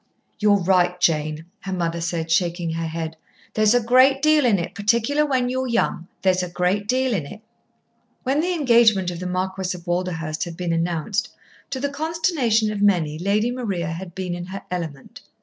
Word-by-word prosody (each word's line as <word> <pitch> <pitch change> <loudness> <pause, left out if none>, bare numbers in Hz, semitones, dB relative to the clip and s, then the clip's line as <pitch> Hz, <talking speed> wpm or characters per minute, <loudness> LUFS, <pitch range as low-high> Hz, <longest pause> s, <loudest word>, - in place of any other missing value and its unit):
"You're 210 -1 +4
right, 180 -1 +2
Jane!" 155 -1 0
her 195 - -6
mother 170 -2 -2
said, 165 -1 -2
shaking 170 0 +1
her 165 0 -2
head. 160 0 -5 0.4
"There's 215 +1 +3
a 245 - +3
great 255 +3 +5
deal 305 -2 +4
in 210 -4 +4
it, 175 +1 -4
particular 235 +9 +1
when 255 -3 +1
you're 260 +1 -1
young. 210 -7 0 0.2
There's 185 -1 +3
a 180 - -4
great 180 +4 0
deal 255 +1 +1
in 160 -9 -2
it." 210 - -11 0.8
When 270 +3 +1
the 355 +3 +1
engagement 235 - +4
of 170 - -6
the 180 - -4
Marquis 185 0 -2
of 170 - -15
Walderhurst 175 -2 -2
had 170 -1 -8
been 175 -2 -1
announced, 175 +7 -1 0.4
to 265 - -3
the 285 +2 -1
consternation 285 - 0
of 205 -1 -4
many, 170 -7 +2
Lady 210 +6 +1
Maria 200 -10 -3
had 175 +1 -7
been 185 -2 -3
in 175 0 -5
her 195 +2 -7
element. 160 -6 -6
190 Hz, 185 wpm, -22 LUFS, 170-235 Hz, 0.8 s, great